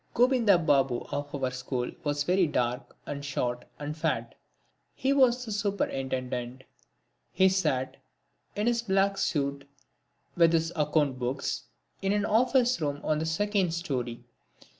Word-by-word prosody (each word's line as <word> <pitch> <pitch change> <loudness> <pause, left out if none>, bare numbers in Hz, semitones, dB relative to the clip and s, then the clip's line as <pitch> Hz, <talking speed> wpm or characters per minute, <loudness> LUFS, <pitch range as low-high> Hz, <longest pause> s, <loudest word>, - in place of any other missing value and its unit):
Gobinda 240 -5 +5
Babu 135 -6 +2
of 145 0 -3
our 130 - +1
school 125 -1 -3
was 145 -1 0
very 180 +2 +3
dark, 125 -2 -2
and 140 -1 -5
short 125 -3 -2
and 150 +1 -5
fat. 155 - -1 0.6
He 270 +1 +1
was 255 -2 +4
the 220 - -6
Superintendent. 130 - -2 0.7
He 190 +1 +4
sat, 150 -9 0 0.6
in 210 - -1
his 235 -1 +2
black 195 -2 +1
suit, 140 -4 -1 0.7
with 170 -1 +5
his 165 0 +1
account 150 -4 +1
books, 130 +2 -2 0.4
in 195 +1 +1
an 205 0 +1
office 245 +1 +3
room 145 -1 -1
on 155 -1 +1
the 160 - -2
second 190 0 +1
storey. 125 -8 -3
155 Hz, 140 wpm, -28 LUFS, 135-200 Hz, 0.7 s, Gobinda